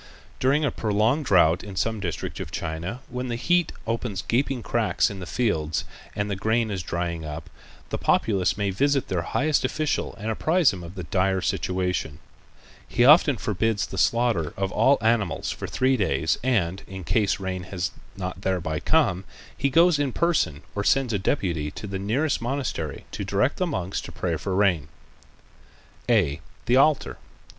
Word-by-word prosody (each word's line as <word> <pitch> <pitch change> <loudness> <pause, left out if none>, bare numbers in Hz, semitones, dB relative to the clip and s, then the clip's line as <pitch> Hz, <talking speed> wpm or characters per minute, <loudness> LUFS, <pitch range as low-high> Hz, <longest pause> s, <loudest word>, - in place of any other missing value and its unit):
During 140 +4 +3
a 140 - +1
prolonged 110 +8 +1
drought 90 -5 +4
in 100 -2 -8
some 110 +6 -1
district 90 -5 -4
of - - -5
China, 85 +8 -4
when 125 +1 -4
the 120 - -2
heat 175 +7 +2
opens 115 -4 -2
gaping 130 0 0
cracks - - +1
in 100 - -7
the 90 - -7
fields 80 -11 0 0.3
and 100 0 -1
the 100 - -2
grain 110 +3 0
is 95 -2 -2
drying 85 -1 -3
up, 75 0 -7 0.4
the - - -2
populace 100 -4 +2
may 100 -1 0
visit 140 +7 +1
their 90 -3 0
highest 150 - +1
official 150 +3 -1
and 110 +2 -3
apprise 160 - +3
him 90 - -7
of 85 +3 -9
the 90 - -5
dire 95 +4 +1
situation. 90 -5 -1 0.7
He 120 - +2
often 145 -2 +7
forbids 105 +2 0
the 95 - -5
slaughter 115 -10 +1
of 95 0 -1
all 135 +5 +4
animals 110 -8 +1
for - - -5
three 130 0 +2
days 80 - +1
and, 95 -8 +1
in 95 -1 -7
case 100 +4 +1
rain 95 -1 -3
has 90 -3 -3 0.3
not 90 -1 -5
thereby 85 -5 -1
come, 120 - +2 0.3
he 140 - 0
goes 165 +2 +5
in 140 -4 0
person 160 - +1
or 100 - -2
sends 130 +1 +2
a 100 - +1
deputy 85 - -1
to 105 - -8
the 95 -1 -4
nearest 125 +10 0
monastery 120 - -3
to 100 - -4
direct 100 +8 +1
the 185 - 0
monks 95 - -2
to - - -9
pray 85 -3 -2
for 95 +5 -3
rain. 90 -7 +2 1.2
_(a) 95 -12 +3 0.3
The 120 - +3
Altar. 145 +1 +3
100 Hz, 175 wpm, -25 LUFS, 90-125 Hz, 1.2 s, often